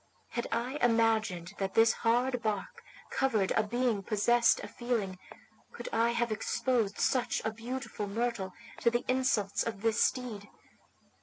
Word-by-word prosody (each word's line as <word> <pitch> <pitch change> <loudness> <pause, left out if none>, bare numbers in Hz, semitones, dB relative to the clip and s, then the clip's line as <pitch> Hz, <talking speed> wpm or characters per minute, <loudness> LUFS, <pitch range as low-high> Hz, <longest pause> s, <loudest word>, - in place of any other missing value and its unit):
Had 235 - -2
I 250 +5 -2
imagined 220 -6 +2
that 195 -1 -2
this 225 0 +6
hard 245 +2 +1
bark 210 -3 -3 0.3
covered 220 -8 +1
a - - +3
being 235 0 0
possessed 235 +4 +3
of - - -8
feeling, 220 -7 -2 0.5
could - - -6
I 230 +1 +3
have 235 -1 0
exposed 220 -1 0
such 255 -2 +1
a 220 - +1
beautiful 235 -1 -5
myrtle 220 -2 -2 0.3
to 235 - +4
the 240 +1 -1
insults 255 -6 +1
of 220 -3 -3
this 225 0 +3
steed? 225 -6 -2
230 Hz, 145 wpm, -31 LUFS, 210-245 Hz, 0.5 s, this